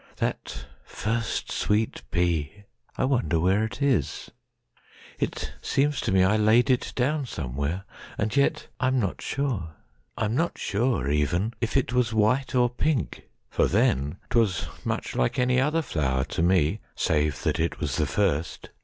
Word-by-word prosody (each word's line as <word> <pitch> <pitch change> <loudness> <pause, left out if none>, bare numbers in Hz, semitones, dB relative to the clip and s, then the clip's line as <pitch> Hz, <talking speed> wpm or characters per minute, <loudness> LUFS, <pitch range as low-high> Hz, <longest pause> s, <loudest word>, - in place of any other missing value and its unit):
That - - -3 0.2
first 115 +2 -2
sweet 105 +1 0
pea! 85 +2 -1 0.3
I - - +2
wonder 125 -11 +1
where 95 +5 +3
it 110 +5 -3
is.It 125 - -4
seems 145 +1 +1
to 110 - -1
me 95 -1 +5
I 100 +4 +3
laid 110 +5 +4
it 125 - 0
down 140 +2 0
somewhere, 70 - -3 0.3
And 110 +3 -1
yet,—I 140 -2 0
am 130 0 +2
not 100 -6 -2
sure. 110 - -2 0.4
I - - 0
am 105 - -1
not 165 +7 0
sure, 105 - 0
Even, 85 +9 +1
if 115 +3 0
it 130 -1 0
was 120 -3 +1
white 130 +6 +2
or 125 -1 +5
pink; 135 +3 -2 0.2
for - - +2
then'Twas 90 - +1 0.2
much - - -3
like 60 -1 +1
any 125 0 +3
other 155 +4 +1
flower 65 - 0
to 90 - 0
me, 85 +1 +3 0.2
Save 75 -2 0
that - - 0
it 85 +1 -1
was 70 -5 -2
the 75 - +1
first. 85 -2 -1
105 Hz, 155 wpm, -26 LUFS, 80-125 Hz, 0.4 s, me